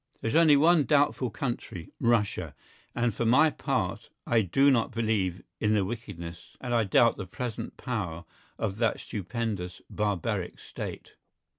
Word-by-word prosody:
There 115 Hz, -, -2 dB
is -, -, -2 dB
only 160 Hz, -3 st, +7 dB
one 160 Hz, 0 st, +5 dB
doubtful 145 Hz, -4 st, +2 dB
country, 115 Hz, -, -5 dB
Russia, 115 Hz, -3 st, +1 dB, 0.4 s
and 120 Hz, -1 st, +1 dB
for 115 Hz, -, -2 dB
my 125 Hz, +7 st, +6 dB
own 155 Hz, -, +2 dB
part -, -, -2 dB, 0.2 s
I 115 Hz, -1 st, +3 dB
do 135 Hz, +9 st, +4 dB
not 115 Hz, -4 st, +2 dB
believe 110 Hz, -6 st, -1 dB, 0.2 s
in 110 Hz, 0 st, +2 dB
the 100 Hz, -2 st, +2 dB
wickedness 90 Hz, -7 st, -7 dB
and 125 Hz, -2 st, -3 dB
I 115 Hz, -2 st, +3 dB
doubt 115 Hz, +4 st, +4 dB
the 95 Hz, -, -6 dB
present 115 Hz, +3 st, -5 dB
power 90 Hz, -10 st, -4 dB, 0.3 s
of 100 Hz, -2 st, -2 dB
that 115 Hz, -1 st, +1 dB
stupendous 105 Hz, -4 st, -4 dB
barbaric 105 Hz, -5 st, -1 dB
State. -, -, -7 dB
115 Hz, 155 wpm, -28 LUFS, 95-125 Hz, 0.4 s, only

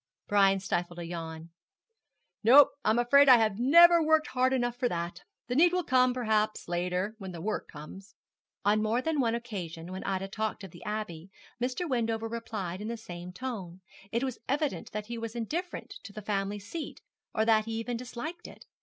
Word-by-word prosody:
Brian 195 Hz, -1 st, +4 dB
stifled 175 Hz, -2 st, -2 dB
a 170 Hz, -, -5 dB
yawn. 165 Hz, -1 st, -7 dB, 0.9 s
'No; 265 Hz, +6 st, +8 dB
I'm 215 Hz, +2 st, +3 dB
afraid 280 Hz, +4 st, +6 dB
I 250 Hz, -, +10 dB
have 215 Hz, -2 st, +1 dB
never 340 Hz, +6 st, +7 dB
worked 315 Hz, 0 st, +3 dB
hard 255 Hz, 0 st, +2 dB
enough 240 Hz, -2 st, 0 dB
for 245 Hz, 0 st, 0 dB
that. 170 Hz, -2 st, -4 dB, 0.2 s
The 245 Hz, +1 st, -3 dB
need 345 Hz, +5 st, +5 dB
will 360 Hz, 0 st, +1 dB
come, 255 Hz, -2 st, +3 dB
perhaps, 220 Hz, -3 st, 0 dB
later 180 Hz, +4 st, -1 dB
when 190 Hz, -2 st, -7 dB
the 170 Hz, -, -7 dB
work 210 Hz, +6 st, -3 dB
comes.' 175 Hz, +6 st, -11 dB, 0.5 s
On 210 Hz, +1 st, +3 dB
more 225 Hz, +4 st, 0 dB
than 320 Hz, -2 st, 0 dB
one 235 Hz, -3 st, +2 dB
occasion 180 Hz, -8 st, -6 dB
when 190 Hz, -, -6 dB
Ida 195 Hz, 0 st, -2 dB
talked 215 Hz, +1 st, -3 dB
of 190 Hz, -, -9 dB
the -, -, -13 dB
Abbey, 195 Hz, -5 st, -5 dB, 0.3 s
Mr. 255 Hz, +8 st, -1 dB
Wendover 225 Hz, -4 st, -1 dB
replied 215 Hz, -5 st, -5 dB
in 210 Hz, -, -5 dB
the 235 Hz, +1 st, -3 dB
same 180 Hz, -4 st, -8 dB
tone. 190 Hz, -6 st, -6 dB, 0.3 s
It 235 Hz, +3 st, 0 dB
was 260 Hz, -3 st, -3 dB
evident 290 Hz, +2 st, -1 dB
that 210 Hz, 0 st, -4 dB
he 235 Hz, +1 st, -6 dB
was 230 Hz, 0 st, -6 dB
indifferent 330 Hz, -, -4 dB
to -, -, -10 dB
the 215 Hz, +1 st, -9 dB
family 200 Hz, 0 st, -1 dB
seat, 225 Hz, -, -7 dB, 0.3 s
or 220 Hz, -, +2 dB
that 220 Hz, -1 st, +4 dB
he 225 Hz, -, -4 dB
even 230 Hz, +2 st, -3 dB
disliked 250 Hz, +8 st, -6 dB
it. -, -, -14 dB
220 Hz, 190 wpm, -29 LUFS, 195-250 Hz, 0.9 s, I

